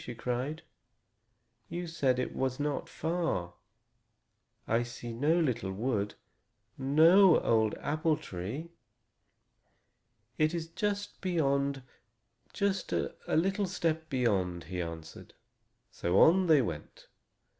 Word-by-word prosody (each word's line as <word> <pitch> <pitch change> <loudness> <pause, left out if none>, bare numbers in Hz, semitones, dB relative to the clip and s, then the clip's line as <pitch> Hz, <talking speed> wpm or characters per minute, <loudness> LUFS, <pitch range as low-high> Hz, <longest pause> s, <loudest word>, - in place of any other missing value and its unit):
she 120 - -7
cried. 125 +7 -3 1.1
"You 175 +1 -4
said 140 -6 +1
it 125 - -3
was 130 0 -1
not 145 0 -2
far. 160 - -2 1.1
I 115 +2 +2
see 120 0 -6
no 150 +8 +2
little 120 - 0
wood, 105 0 -2 0.6
no 160 +7 +6
old 110 -2 +2
apple 155 +1 0
tree." 110 - -6 1.7
"It 155 +2 +2
is 165 -1 -4
just 205 +3 -3
beyond, 140 -6 0 0.7
just 200 -2 -1
a - - -1
little 195 +4 +1
step 160 -3 -1
beyond," 95 - 0
he 90 -1 -4
answered. 80 -1 -8 0.6
So 90 +3 +1
on 185 +3 +6
they 150 -5 +5
went. 80 -8 -7
140 Hz, 110 wpm, -31 LUFS, 115-165 Hz, 1.7 s, no